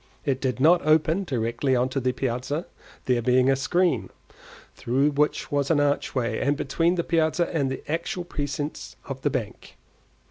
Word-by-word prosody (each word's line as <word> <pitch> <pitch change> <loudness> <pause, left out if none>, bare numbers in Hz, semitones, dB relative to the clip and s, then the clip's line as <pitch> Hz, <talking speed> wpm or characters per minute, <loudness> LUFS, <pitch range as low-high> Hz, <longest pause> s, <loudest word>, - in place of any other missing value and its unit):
It 135 -3 0
did 130 -1 -1
not 165 +6 +5
open 160 +5 +2
directly 120 -1 0
on 125 +1 +2
to 135 - -2
the 130 0 0
piazza, 130 +5 -3 0.4
there 125 -2 +2
being 125 +2 +3
a - - +3
screen, 175 +7 +1 0.6
through 135 +5 +1
which 150 +1 0
was 140 -1 0
an 155 - +3
archway, 140 -3 0
between 165 +5 0
the 170 - 0
piazza 165 +1 +1
and 140 -4 +1
the 130 - -5
actual 170 +3 -2
precincts 145 -3 -5
of 135 -1 -6
the 145 - +1
bank. 125 -6 -5
140 Hz, 165 wpm, -25 LUFS, 130-155 Hz, 0.6 s, not